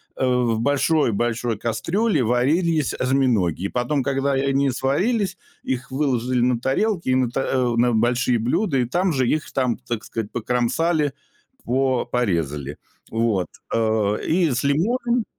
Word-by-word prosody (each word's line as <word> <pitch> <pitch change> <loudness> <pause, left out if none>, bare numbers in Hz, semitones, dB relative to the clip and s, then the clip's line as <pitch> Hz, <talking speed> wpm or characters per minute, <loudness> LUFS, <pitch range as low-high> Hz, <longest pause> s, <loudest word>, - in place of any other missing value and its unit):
э, - - -3
в 120 -3 +1
большой 145 +1 +2
большой 115 +1 -1
кастрюле 165 - 0
варились 150 +6 +1
осьминоги. 125 - +1
И - - 0
потом, 125 +3 -1
когда 140 0 0
они 135 +1 +1
сварились, 190 - 0 0.3
их 130 +2 -3
выложили 130 -3 0
на 125 -1 +2
тарелки, 170 - 0
и 130 - +3
на 125 -2 +1
та 135 - -1
э, 125 -2 0
на 120 0 +3
большие 120 +2 +2
блюда, 135 - 0
и 125 - +2
там 175 +9 0
же 130 -3 +1
их, 155 +3 -1
там, 125 -3 0
так 120 -3 -5
сказать, 110 -2 -5
покромсали, 135 +6 0 0.5
по 130 -1 +1
порезали. 75 - -2 0.3
Вот, 110 -6 0 0.3
э, 110 -2 +1
и 170 -1 +2
с 120 - -1
лимонами 235 - +1
130 Hz, 150 wpm, -22 LUFS, 120-145 Hz, 0.5 s, и